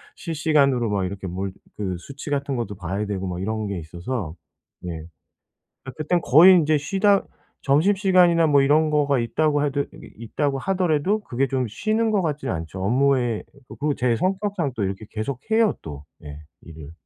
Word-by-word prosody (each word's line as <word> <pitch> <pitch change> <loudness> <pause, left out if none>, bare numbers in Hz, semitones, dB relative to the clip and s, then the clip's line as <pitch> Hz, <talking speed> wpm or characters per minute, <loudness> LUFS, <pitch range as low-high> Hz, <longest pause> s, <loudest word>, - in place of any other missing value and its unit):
실시간으로 145 - +1
막 100 -2 0
이렇게 95 +1 -6
뭘 95 +2 -4 0.2
그 95 -4 -3
수치 140 - -9
같은 140 -1 -1
것도 110 -4 -4
봐야 95 +3 -3
되고 95 -2 -3
막 90 0 -4
이런 110 +2 -2
게 100 -3 -4
있어서. 85 +3 -5 0.5
예. 85 -2 -5 0.8
아 130 - -6
그땐 165 +3 0
거의 165 +8 +7
인제 155 -2 +3
쉬다 195 +6 +2 0.4
점심시간이나 175 +2 +4
뭐 145 -2 +4
이런 155 +3 +3
거가 145 -3 +2
있다고 145 +5 +1
해도 145 -1 0
이 - - -13
있다고 135 +5 -2
하더라도 185 +3 0
그게 135 - -2
좀 130 -1 -1
쉬는 215 - 0
것 205 -2 +2
같진 150 -3 -3
않죠. 85 +3 -4
업무에 125 0 +1 0.2
그리고 145 0 -2
제 125 -2 +1
성격상 190 - -1
또 110 - -2
이렇게 95 +2 -4
계속해요 140 - 0
또 75 -3 -8 0.2
예 75 -1 -9 0.2
일을. 80 -2 -11
135 Hz, 330 characters per minute, -23 LUFS, 100-155 Hz, 0.8 s, 거의